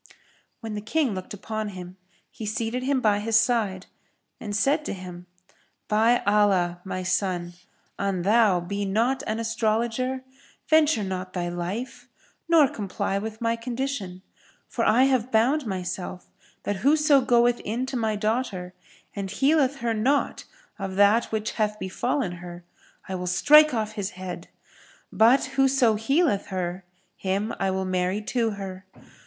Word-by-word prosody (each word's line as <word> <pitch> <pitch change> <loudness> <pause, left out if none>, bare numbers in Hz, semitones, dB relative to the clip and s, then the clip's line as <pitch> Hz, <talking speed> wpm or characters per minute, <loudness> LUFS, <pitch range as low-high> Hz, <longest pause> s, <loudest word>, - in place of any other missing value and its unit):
When 225 -2 -5
the 210 - -4
King 255 +2 0
looked 185 -1 -7
upon 215 +1 -4
him, 180 0 -9 0.4
he - - -9
seated 225 +3 -2
him 265 0 0
by 210 -3 +3
his 220 +1 -1
side 220 -5 0 0.5
and 205 -1 -5
said 285 +8 +2
to - - -3
him, 180 -2 -9 0.6
"By 225 +3 +3
Allah, 195 -4 +2
O - - -31
my 185 -1 -3
son, 180 -2 -1 0.5
an 195 -3 -1
thou 205 -3 +4
be 200 +4 -3
not 230 +7 +1
an 215 0 -1
astrologer, 230 +3 -1 0.4
venture 310 -7 +4
not 185 -1 -5
thy 175 -1 -2
life 180 +8 -5 0.4
nor 320 -4 +6
comply 195 -3 -3
with 220 +2 -6
my 230 0 +1
condition; 230 -6 -4 0.4
for 230 - -2
I 230 +4 +4
have 260 -2 +1
bound 245 +5 +2
myself 185 -1 -5 0.3
that 205 - -2
whoso 285 +4 +4
goeth 240 -1 +3
in 235 +5 -3
to 265 - -5
my 220 -3 0
daughter 210 -4 -2 0.4
and 200 -1 -4
healeth 275 +2 +2
her 235 -1 0
not 260 +7 0 0.3
of 195 -1 -4
that 205 +4 +4
which 220 0 -3
hath 210 -1 -1
befallen 215 +3 -2
her 175 0 -9 0.4
I 190 - -5
will 180 -1 -4
strike 300 +12 +6
off 220 -3 -2
his 205 -3 -3
head; 180 -2 -7 0.7
but 235 +5 +5
whoso 265 -3 +3
healeth 225 - +1
her 185 -1 -4 0.3
him 200 +3 -2
I 195 - +1
will 190 0 -1
marry 185 +2 -1
to 235 0 0
her. 190 -1 -8
215 Hz, 150 wpm, -25 LUFS, 190-245 Hz, 0.7 s, nor